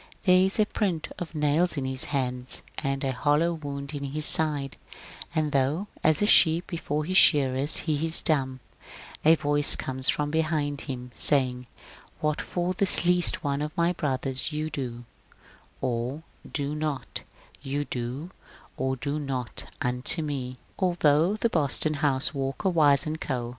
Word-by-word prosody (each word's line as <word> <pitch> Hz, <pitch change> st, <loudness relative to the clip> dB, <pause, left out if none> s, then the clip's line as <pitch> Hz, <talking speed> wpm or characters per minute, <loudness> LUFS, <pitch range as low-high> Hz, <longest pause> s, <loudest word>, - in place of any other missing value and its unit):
There 185 Hz, -2 st, +4 dB
is 190 Hz, +3 st, +2 dB
a 215 Hz, -, +4 dB
print 185 Hz, -7 st, -3 dB
of 170 Hz, -2 st, -8 dB
nails 150 Hz, +3 st, 0 dB
in 135 Hz, -, -3 dB
his 130 Hz, 0 st, -2 dB
hands, 125 Hz, -3 st, +1 dB, 0.2 s
and 135 Hz, 0 st, -3 dB
a 135 Hz, -, -1 dB
hollow 150 Hz, +6 st, 0 dB
wound 140 Hz, -2 st, -7 dB
in 140 Hz, -1 st, -6 dB
his 150 Hz, +2 st, -1 dB
side; 145 Hz, -5 st, +3 dB, 0.6 s
and 155 Hz, -2 st, -1 dB
though 145 Hz, +8 st, -1 dB
as 155 Hz, +4 st, +2 dB
a -, -, +3 dB
sheep 170 Hz, -4 st, +5 dB
before 155 Hz, -3 st, -4 dB
his 185 Hz, +3 st, +2 dB
shearers 140 Hz, -3 st, +3 dB
he 155 Hz, -2 st, -1 dB
is 165 Hz, 0 st, +3 dB
dumb, 130 Hz, -5 st, 0 dB, 0.6 s
a 160 Hz, +2 st, +5 dB
voice 145 Hz, -1 st, +2 dB
comes 130 Hz, 0 st, 0 dB
from 145 Hz, 0 st, -1 dB
behind 155 Hz, -3 st, -1 dB
him, 125 Hz, -1 st, -7 dB
saying, 125 Hz, -3 st, +6 dB
^^ -, -, -23 dB, 0.4 s
What 150 Hz, -1 st, -2 dB
for 175 Hz, +1 st, -3 dB
this 185 Hz, -1 st, +3 dB
least 180 Hz, 0 st, +2 dB
one 140 Hz, -1 st, -2 dB
of 150 Hz, +1 st, -6 dB
my 170 Hz, +1 st, +1 dB
brothers 135 Hz, -2 st, -2 dB
you 155 Hz, +1 st, -4 dB
do 120 Hz, -3 st, -6 dB, 0.8 s
or 125 Hz, +5 st, -3 dB, 0.3 s
do 145 Hz, 0 st, -3 dB
not, 150 Hz, -2 st, -5 dB, 0.4 s
you 145 Hz, +1 st, -4 dB
do 130 Hz, +8 st, -6 dB, 0.5 s
or 130 Hz, +1 st, -2 dB
do 145 Hz, +4 st, -4 dB
not 130 Hz, -4 st, -5 dB, 0.2 s
unto 125 Hz, +6 st, -1 dB
me." 130 Hz, -4 st, -5 dB, 0.2 s
Although 175 Hz, 0 st, +2 dB
the 215 Hz, -, 0 dB
Boston 155 Hz, -4 st, +2 dB
house 140 Hz, -2 st, -1 dB
(Walker, 135 Hz, +7 st, -3 dB
Wise 145 Hz, -5 st, +3 dB
& -, -, -30 dB
Co.) 125 Hz, -4 st, -4 dB
145 Hz, 160 wpm, -25 LUFS, 135-160 Hz, 0.8 s, saying